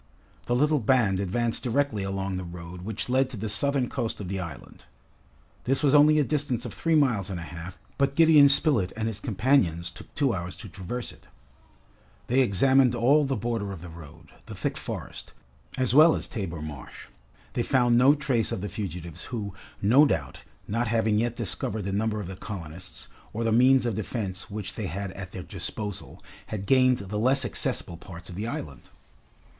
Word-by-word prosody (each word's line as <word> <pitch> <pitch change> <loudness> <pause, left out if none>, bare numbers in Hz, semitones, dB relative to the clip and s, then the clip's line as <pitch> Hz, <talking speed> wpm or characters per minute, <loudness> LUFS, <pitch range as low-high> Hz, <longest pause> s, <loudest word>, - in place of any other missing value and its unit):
The 120 - +1
little 150 +3 +3
band 110 -5 +2
advanced 115 +5 0
directly 125 -3 0
along 95 0 -2
the 90 - -4
road 85 0 -9
which 105 +3 -4
led 130 +1 +2
to 130 - -6
the 110 +2 -3
southern 125 +5 +1
coast 115 - -3
of 95 -4 -6
the 95 0 -2
island. 85 -7 -9 0.8
This 135 +4 +1
was 140 -1 +4
only 150 +1 +6
a 150 - +4
distance 135 -4 -1
of - - -5
three 165 -1 +1
miles 120 - +2
and 95 -3 -4
a - - -6
half, 85 +2 -8 0.2
but 140 0 +2
Gideon 155 -3 +7
Spilett 140 - +3
and 110 0 -1
his 110 -2 -3
companions 95 - +1
took - - -13
two 140 -5 +2
hours 90 -2 -4
to 105 - -10
traverse 95 +7 -5
it. - - -19 1.0
They 125 +3 +2
examined 130 +3 +4
all 140 +6 +4
the 135 -1 -1
border 110 -2 -2
of 90 -4 -8
the 90 - -8
road, 80 -3 -13 0.2
the - - -7
thick - - -2
forest, - - -7 0.4
as 130 -2 +1
well 155 +3 +7
as - - -4
Tabor 85 -7 -5
Marsh. 70 -5 -9 0.5
They - - 0
found 120 -1 +3
no 130 +4 +6
trace 135 -6 0
of - - -3
the 105 - -4
fugitives 85 -6 -6
who, 105 -5 -5 0.3
no 130 +9 +6
doubt, 70 - -2 0.3
not 115 +3 0
having 110 -1 +2
yet 120 +1 0
discovered 105 -1 -2
the 95 +1 -3
number 110 +1 0
of 100 - -5
the 95 - -6
colonists, 90 -3 -8 0.3
or 115 - -2
the 115 - +1
means 130 +3 +5
of 120 - 0
defense 100 -2 -4
which 105 -2 -5
they 105 - -4
had 95 +3 -4
at 95 -1 -8
their 90 - -6
disposal, 105 +1 -6 0.3
had 100 -2 -5
gained 130 +1 +4
the 105 0 -4
less 130 +3 +3
accessible 85 -7 -2
parts 90 +1 -11
of - - -8
the 105 +4 -3
island. 75 - -6
110 Hz, 195 wpm, -27 LUFS, 95-130 Hz, 1.0 s, Gideon